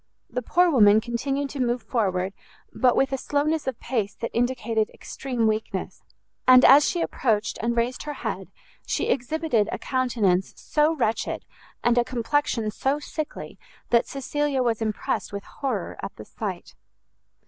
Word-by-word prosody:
The 250 - -2
poor 355 +9 +3
woman 215 -6 +6
continued 270 +5 -2
to 285 - -6
move 240 -2 0
forward, 195 -5 0 0.4
but 250 -2 +3
with 270 0 +2
a 270 - -1
slowness 295 +2 0
of 255 -3 -2
pace 225 -5 -2
that 230 - -4
indicated 235 -2 0
extreme 250 -4 -3
weakness; 220 0 -2 0.5
and, 255 0 +8
as 280 +3 +8
she 345 - -1
approached 215 -8 0
and 235 +1 -1
raised 240 +2 0
her 295 - -5
head, - - -3 0.4
she - - -1
exhibited 250 -4 +1
a - - -2
countenance 225 -8 0
so 305 +2 +1
wretched, 230 -6 -1 0.4
and 240 0 +4
a - - +4
complexion 240 -2 0
so 270 +6 0
sickly, 300 +1 -6 0.3
that 235 -1 +4
Cecilia 275 0 -1
was 230 -2 0
impressed 215 -2 -2
with 200 0 -5
horror 275 -2 -4
at - - -6
the - - -10
sight. - - -6
245 Hz, 155 wpm, -25 LUFS, 225-275 Hz, 0.5 s, and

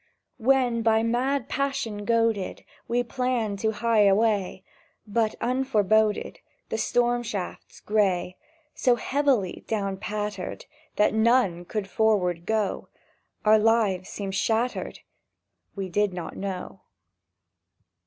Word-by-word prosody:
When, 245 -1 +2
by 225 0 +3
mad 250 +3 0
passion 235 -7 -2
goaded, 230 -4 0 0.2
We 240 +1 +1
planned 240 -5 -1
to 220 - +1
hie 220 0 +2
away, 200 -2 +1 0.4
But, 215 +1 0
unforeboded, 220 -4 +1 0.3
The - - -2
storm 240 0 +1
shafts 200 -6 -6
gray 190 -4 +1 0.4
So 250 -2 +3
heavily 260 -7 0
down 200 -3 -2
pattered 210 -1 -4 0.3
That 210 - +3
none 220 -6 +2
could 210 +1 -3
forthward 185 -6 +1
go, 220 -2 -1 0.6
Our 215 0 +6
lives 210 -4 +2
seemed 195 -2 -5
shattered... 225 +5 -1 0.7
—We 195 -2 -3
did 205 +2 0
not 170 -3 -6
know! 190 -1 -5
220 Hz, 110 wpm, -26 LUFS, 195-235 Hz, 0.7 s, Our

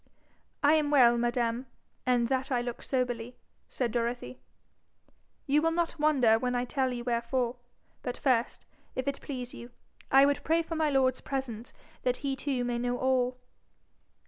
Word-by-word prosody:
'I 290 +2 +6
am 305 -2 +2
well, 250 -5 +6
madam; 240 +1 0 0.4
and 245 -2 +3
that 265 +2 -1
I 250 - +2
look 240 0 -4
soberly,' 245 -2 -2 0.3
said 245 -3 -2
Dorothy, 240 +2 -2 1.1
'you 290 +1 +3
will 325 - +3
not 335 -1 -1
wonder 260 -8 +4
when 250 +1 -1
I 245 0 0
tell 260 0 0
you 240 -1 -4
wherefore. 240 +1 -1 0.4
But 245 - -4
first, 250 -4 0 0.3
if 260 +1 -3
it 280 0 -2
please 250 -3 -6
you, 240 - -9 0.4
I 270 +1 +7
would 285 0 +1
pray 330 +2 +2
for 330 - -6
my 315 -1 +2
lord's 260 -2 +2
presence, 250 -4 -4 0.3
that 250 0 0
he 270 -1 0
too 270 -3 -2
may 240 -1 -1
know 245 0 -1
all.' 255 -1 +1
250 Hz, 165 wpm, -29 LUFS, 240-275 Hz, 1.1 s, I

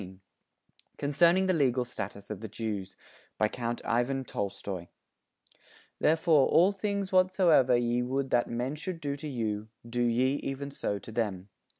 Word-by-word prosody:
_ 95 -1 -10 0.8
CONCERNING 170 +6 +3
THE 185 - +2
LEGAL 130 -6 +2
STATUS 105 -4 -7
OF 105 - -5
THE 110 - -6
JEWS 105 -3 -4 0.4
BY 110 - +2
COUNT 120 0 -3
IVAN 120 +3 0
TOLSTOY 100 -4 -4 1.1
"Therefore 160 -2 +4
all 180 +4 +5
things 200 -1 -2
whatsoever 185 -9 +4
ye 120 0 +1
would 130 +2 -2
that 120 -1 +2
men 125 +4 -2
should 165 +3 -5
do 145 -2 -3
to 145 +2 -7
you, 110 -5 -3 0.2
do 120 +1 -2
ye 125 +3 +2
even 140 +1 -5
so 100 -6 -2
to 110 - -10
them." 105 -4 -2
125 Hz, 155 wpm, -29 LUFS, 110-150 Hz, 1.1 s, all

